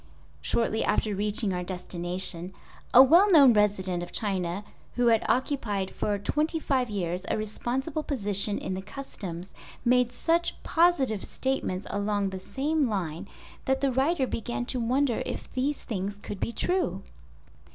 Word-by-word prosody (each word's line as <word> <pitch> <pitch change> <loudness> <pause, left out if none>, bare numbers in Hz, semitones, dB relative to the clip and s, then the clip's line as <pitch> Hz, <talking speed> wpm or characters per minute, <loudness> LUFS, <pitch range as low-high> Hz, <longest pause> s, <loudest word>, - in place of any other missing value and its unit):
Shortly 225 -1 0
after 215 - +1
reaching 205 0 0
our 180 - -2
destination 180 0 0 0.4
a 255 - +10
well 345 +9 +6
known 280 -7 +8
resident 195 -4 +1
of 175 - -7
China, 190 -2 -2 0.3
who 245 - +2
had 230 -1 +4
occupied 225 -8 0
for 205 -1 -1
twenty 305 - -1
five 260 -5 0
years 180 -3 -2
a - - 0
responsible 250 +8 -3
position 205 -7 0
in - - -4
the 190 - -4
"Customs" 190 -6 -8 0.3
made 250 0 +3
such 335 +7 0
positive 295 - +2
statements 260 -8 -2
along 205 -1 -1
the 190 - -5
same 285 +6 -1
line 185 -3 -3 0.4
that 265 0 +1
the 275 -1 +2
writer 270 +3 +1
began 240 0 -3
to 255 0 -2
wonder 250 +2 +1
if - - -6
these 275 +3 0
things 200 -2 -4
could 205 -1 -7
be 230 - -2
true. 230 - -1
220 Hz, 150 wpm, -27 LUFS, 190-265 Hz, 0.4 s, a